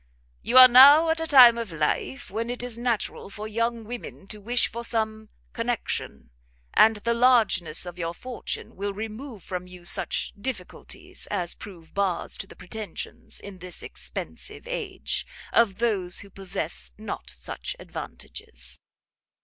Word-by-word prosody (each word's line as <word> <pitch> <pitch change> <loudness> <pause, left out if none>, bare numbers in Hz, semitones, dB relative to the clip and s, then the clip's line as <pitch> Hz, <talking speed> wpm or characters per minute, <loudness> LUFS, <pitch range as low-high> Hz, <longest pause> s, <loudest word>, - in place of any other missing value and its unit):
"You 250 - +2
are 255 0 +13
now 285 +6 +9
at 325 - +1
a 325 - -2
time 245 -5 +8
of 230 -5 -4
life 165 - -2
when 225 +3 -2
it 245 0 -3
is 245 -2 -3
natural 235 -4 -2
for 210 +1 -6
young 230 +1 -1
women 230 -3 -8
to 210 -1 -7
wish 240 +4 +2
for 235 +1 -6
some 220 -2 -1 0.2
connection: - - -3 0.4
and 225 0 +6
the 235 +3 -1
largeness 220 -10 +3
of 175 0 -8
your 165 0 -3
fortune 250 +4 -6
will 200 +1 -3
remove 220 +1 -7
from 180 -1 -5
you 180 -1 -13
such 190 +1 0
difficulties 205 -3 -6
as 180 -4 -1
prove 175 -6 -12
bars 195 -4 -1
to 195 - -5
the - - -13
pretensions, 210 -1 -7
in 195 -2 -10
this 180 0 -6
expensive - - -4
age, - - -3 0.3
of 210 -5 +4
those 200 -6 0
who 200 - -13
possess 175 - -3
not - - -6
such 65 0 -5
advantages. 60 +2 -7
215 Hz, 150 wpm, -26 LUFS, 180-235 Hz, 0.4 s, are